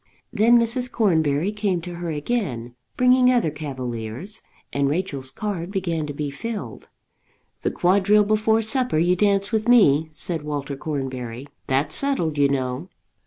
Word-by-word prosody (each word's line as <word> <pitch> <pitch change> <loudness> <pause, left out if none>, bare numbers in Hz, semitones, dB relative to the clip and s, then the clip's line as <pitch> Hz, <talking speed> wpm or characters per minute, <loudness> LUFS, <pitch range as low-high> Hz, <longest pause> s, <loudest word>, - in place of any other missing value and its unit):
Then 235 +2 +5
Mrs. 240 +2 +1
Cornbury 160 -5 +1
came 205 -4 -1
to 175 +1 -7
her 175 -1 -4
again, 145 - -3 0.2
bringing 250 0 +5
other 235 -11 +2
cavaliers, 130 - -6 0.3
and 140 -1 +1
Rachel's 145 -5 -2
card 180 +2 -4
began 170 -6 -2
to 145 - -5
be 145 0 -4
filled. 220 +9 -6 0.7
"The - - 0
quadrille 200 +3 +3
before 215 +2 +2
supper 250 - 0
you 175 +3 +3
dance 200 +1 +1
with 220 0 0
me," 160 - +5
said 160 +1 -3
Walter 145 -2 -4
Cornbury. 130 -4 -5 0.2
"That's 140 +3 0
settled, 175 - +1
you 140 -1 +4
know." 135 +4 -2
170 Hz, 145 wpm, -23 LUFS, 140-215 Hz, 0.7 s, Then